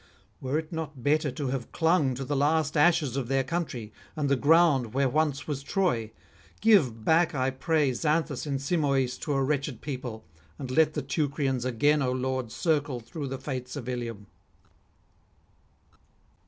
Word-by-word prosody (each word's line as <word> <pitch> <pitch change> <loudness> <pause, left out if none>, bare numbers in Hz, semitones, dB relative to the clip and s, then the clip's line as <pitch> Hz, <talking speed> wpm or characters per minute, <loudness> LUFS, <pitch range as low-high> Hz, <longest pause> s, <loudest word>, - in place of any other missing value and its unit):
Were 135 +3 -1
it 160 -1 -4
not 155 -6 -6
better 150 +2 +2
to 135 +1 -3
have 130 -2 -2
[59 - - -31
91]clung 160 -6 +2
to 135 +2 -5
the 145 - -2
last 145 +1 +1
ashes 150 -4 +3
of 135 -4 -2
their 135 +1 +1
country, 130 -8 -4 0.2
and 150 -3 -1
the 140 - +4
ground 145 -5 +3
where 135 0 +3
once 145 +1 0
was 145 -3 -3
Troy? 140 - 0 0.5
Give 140 - +3
back, 165 0 +3
I 130 0 +1
pray, 145 +1 +1
Xanthus 150 -1 -1
and 140 -1 -1
Simoïs 140 -4 0
to 150 - -2
a 135 -1 +1
wretched 140 -3 -1
people, 125 -7 -6 0.3
and 130 -2 -6
let 155 +2 +3
the 150 - -2
Teucrians 140 -3 -1
again, 145 +5 +2
O 130 -2 +1
Lord, 130 -2 -2
circle 145 -5 0
through 140 +6 -6
the 135 0 -4
fates 130 -2 -5
of 130 -5 -6
Ilium.' 115 -4 -4
140 Hz, 170 wpm, -27 LUFS, 130-155 Hz, 0.5 s, the